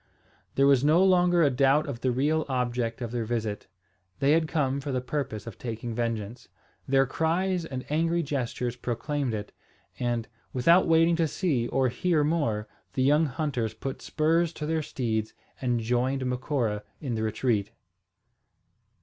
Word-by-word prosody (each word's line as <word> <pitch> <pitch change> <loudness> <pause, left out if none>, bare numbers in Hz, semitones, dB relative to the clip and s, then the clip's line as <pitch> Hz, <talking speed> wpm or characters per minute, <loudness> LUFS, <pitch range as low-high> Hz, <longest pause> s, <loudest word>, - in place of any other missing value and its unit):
There 135 - +4
was 140 -2 +5
no 160 +5 +5
longer 175 -2 +4
a 145 - +4
doubt 135 +4 +3
of 125 -4 -5
the 130 - +1
real 150 +6 +1
object 125 -2 -1
of 120 -2 -4
their 120 -1 -1
visit. 110 -2 -3 0.5
They 140 +1 +3
had 160 0 +3
come 140 -4 0
for 140 - -4
the 130 - 0
purpose 125 -4 -4
of 115 -4 -9
taking 115 0 -5
vengeance. 115 0 -3 0.4
Their 135 0 +4
cries 170 +5 0
and 130 -5 -5
angry 165 +3 +1
gestures 125 -4 -2
proclaimed 125 +1 -2
it; 105 0 -6 0.5
and, 120 -2 -1 0.3
without 170 +9 +4
waiting 165 +1 +4
to 165 -1 +2
see 145 -7 0
or 130 0 +1
hear 155 +5 +1
more, 145 -10 0 0.3
the 130 - +1
young 150 +4 +4
hunters 130 -6 -2
put 135 - -5
spurs 165 +2 +1
to 150 - -5
their 160 +1 0
steeds 110 -6 -2 0.3
and 125 -2 +1
joined 125 +3 0
Macora 125 -4 -1 0.2
in 135 -6 -3
the 110 - -2
retreat. 110 -1 0
130 Hz, 160 wpm, -27 LUFS, 120-155 Hz, 0.5 s, was